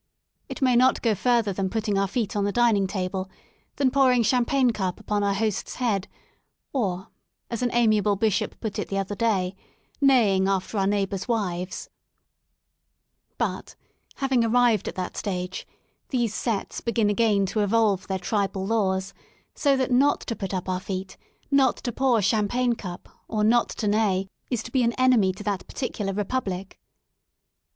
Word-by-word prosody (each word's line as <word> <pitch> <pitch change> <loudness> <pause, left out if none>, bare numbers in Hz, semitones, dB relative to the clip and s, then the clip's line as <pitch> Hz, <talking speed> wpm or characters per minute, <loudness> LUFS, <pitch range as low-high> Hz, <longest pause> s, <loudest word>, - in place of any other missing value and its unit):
It - - -4
may 255 -2 +4
not 255 +2 +4
go 230 -3 +3
further 230 0 +1
than 190 0 -1
putting 215 0 -1
our 195 0 +2
feet 215 -1 -2
on 205 - +1
the 205 - 0
dining 220 -4 +3
table, 190 0 -3 0.5
than 270 -2 +2
pouring 255 -3 +4
champagne 250 +2 +2
cup 190 -5 -3
upon 210 -1 -1
our 200 -1 +1
host's 210 -1 -2
head, 215 -6 -1 0.7
or, 190 -8 -2 0.4
as 235 - -3
an 245 - +1
amiable 215 -3 +3
bishop 210 -1 0
put 220 -3 -4
it - - -3
the 195 - -3
other 195 +1 -2
day, 200 -4 0 0.2
'* - - -40 0.2
neighing 220 -9 +4
after 195 +2 -1
our 195 - +2
neighbours* 195 -1 -1
wives," 185 -6 -3 1.5
but, - - -3 0.4
having 265 -3 +1
arrived 230 -2 +3
at - - -4
that 185 -1 -4
stage, 180 -2 -4 0.4
these 240 -5 0
sets" 220 -4 -2
begin 230 -3 +1
again 205 -2 +2
to 215 - -2
evolve 205 -2 +2
their 190 - -1
tribal 195 0 -1
laws, 190 -3 0 0.4
so 280 -2 +2
that 260 -1 -1
not 270 +4 +3
to 230 - -4
put 195 -3 -5
up 185 -1 -3
our 185 -1 -1
feet, 190 0 -5 0.4
not 270 -3 +4
to 245 - -4
pour 245 -3 +2
champagne 225 +5 +1
cup, 180 -6 -8 0.2
or 215 -1 -1
not 235 +2 +3
to 210 - -3
neigh 205 -3 +1 0.2
is 240 -4 -1
to 235 - -9
be 260 - +2
an 235 0 +2
enemy 250 -7 +4
to 190 +3 -9
that 200 -2 -3
particular 210 -6 -3
republic. 195 -2 -3
210 Hz, 170 wpm, -25 LUFS, 195-240 Hz, 1.5 s, may